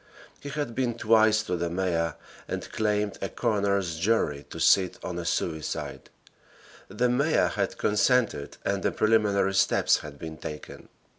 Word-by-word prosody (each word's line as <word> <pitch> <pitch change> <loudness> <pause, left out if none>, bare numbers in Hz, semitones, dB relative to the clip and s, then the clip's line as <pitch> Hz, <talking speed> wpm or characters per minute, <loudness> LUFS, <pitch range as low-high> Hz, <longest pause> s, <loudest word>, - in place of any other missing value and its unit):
He 145 - -8
had 145 -4 -3
been 120 -2 -1
twice 110 -1 +4
to 90 -4 -2
the 85 0 -2
mayor 85 -3 -1 0.3
and - - -5
claimed 105 -1 -1
a 95 - -2
coroner's 100 -7 0
jury 85 -8 0
to - - -8
sit 95 -2 +3
on 90 -1 -4
a 85 - -5
suicide. 80 -2 -3 0.8
The 125 - 0
mayor 140 +6 +2
had - - -2
consented 105 - +1
and 100 -1 0
the - - +1
preliminary 105 -3 +2
steps 95 - +3
had 75 -2 -9
been 80 +1 -8
taken. 75 0 -9
100 Hz, 150 wpm, -27 LUFS, 85-115 Hz, 0.8 s, twice